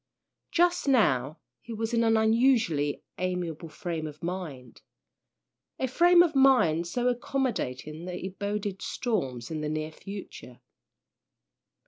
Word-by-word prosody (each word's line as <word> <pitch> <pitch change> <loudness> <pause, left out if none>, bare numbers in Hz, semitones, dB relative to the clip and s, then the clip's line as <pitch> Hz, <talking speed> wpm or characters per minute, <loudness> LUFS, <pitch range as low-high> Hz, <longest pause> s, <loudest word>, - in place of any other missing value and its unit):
Just 350 -2 +2
now 155 - +2 0.2
he 235 - -8
was 225 +1 -3
in 230 0 +3
an 225 -1 +4
unusually 220 - +2 0.2
amiable 180 -3 -3
frame 165 -1 -4
of 150 +1 -11
mind, 160 -9 -6 1.0
a 260 - -1
frame 345 +6 +6
of 335 -2 0
mind 245 -12 +4
so 245 +7 -1
accommodating 235 - -2
that 180 -1 -5
it 190 0 -8
boded 205 -1 -3
storms 135 - -2
in 155 -1 -3
the 150 - -2
near 155 0 -3
future. 195 -9 -10
190 Hz, 125 wpm, -28 LUFS, 155-240 Hz, 1.0 s, frame